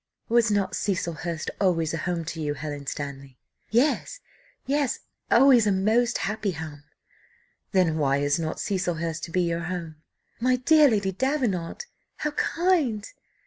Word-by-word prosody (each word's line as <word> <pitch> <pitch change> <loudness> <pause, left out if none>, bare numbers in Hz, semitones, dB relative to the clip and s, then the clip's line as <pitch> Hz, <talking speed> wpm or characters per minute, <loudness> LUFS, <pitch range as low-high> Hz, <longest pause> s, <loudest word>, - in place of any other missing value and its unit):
"Was 230 -1 +4
not 205 -2 0
Cecilhurst 170 -4 -2
always 165 -5 +1
a - - -1
home 170 0 -2
to 160 0 -5
you, 145 -1 -1
Helen 145 -1 -6
Stanley?" 140 -3 -6 0.3
"Yes, 290 - +1 0.5
yes, 280 -2 0 0.3
always 245 -3 +6
a - - +4
most 220 +5 +2
happy 215 -1 -2
home!" 150 -2 -8 0.9
"Then 175 -5 +2
why 140 -2 +2
is 145 +2 +1
not 160 -1 -3
Cecilhurst 170 -4 -2
to 165 - -11
be 180 - +2
your 170 0 -1
home?" 170 -3 -5 0.4
"My 250 +2 +3
dear 295 +4 +5
Lady 200 -4 +1
Davenant! 245 - -1 0.3
how 300 - -2
kind! 300 - +1
185 Hz, 145 wpm, -26 LUFS, 160-235 Hz, 0.9 s, always